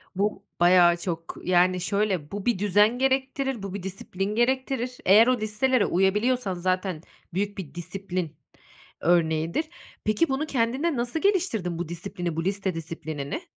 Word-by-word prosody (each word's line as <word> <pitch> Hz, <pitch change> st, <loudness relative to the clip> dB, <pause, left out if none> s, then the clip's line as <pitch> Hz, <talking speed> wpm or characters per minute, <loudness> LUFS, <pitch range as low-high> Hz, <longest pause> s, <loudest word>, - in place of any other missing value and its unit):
bu 200 Hz, +1 st, -1 dB
bayağı 175 Hz, -1 st, +6 dB
çok, 165 Hz, -2 st, -5 dB
yani, 180 Hz, 0 st, +3 dB
şöyle, 195 Hz, -6 st, -1 dB
bu 200 Hz, -1 st, -5 dB
bir 235 Hz, -6 st, +1 dB
düzen 210 Hz, +4 st, +3 dB
gerektirir, 265 Hz, -2 st, 0 dB
bu 195 Hz, -1 st, -5 dB
bir 200 Hz, -3 st, -5 dB
disiplin 195 Hz, +1 st, -4 dB
gerektirir. 255 Hz, 0 st, 0 dB
Eğer 210 Hz, +5 st, +7 dB
o 255 Hz, -1 st, +2 dB
listelere 215 Hz, +3 st, +1 dB
uyabiliyorsan 205 Hz, +4 st, +1 dB
zaten 185 Hz, -1 st, -1 dB, 0.3 s
büyük 205 Hz, +2 st, -2 dB
bir 170 Hz, -6 st, -7 dB
disiplin 180 Hz, -2 st, -4 dB, 0.7 s
örneğidir. 165 Hz, -, +2 dB, 0.4 s
Peki, 215 Hz, +9 st, +2 dB
bunu 270 Hz, +4 st, 0 dB
kendinde 265 Hz, +5 st, 0 dB
nasıl 240 Hz, +6 st, -2 dB
geliştirdin; 230 Hz, -, 0 dB
bu 175 Hz, -, -4 dB
disiplini, 175 Hz, -1 st, -4 dB
bu 165 Hz, +1 st, -2 dB
liste 195 Hz, -1 st, -1 dB
disiplinini? 160 Hz, -, -5 dB
195 Hz, 140 wpm, -26 LUFS, 175-240 Hz, 0.7 s, Eğer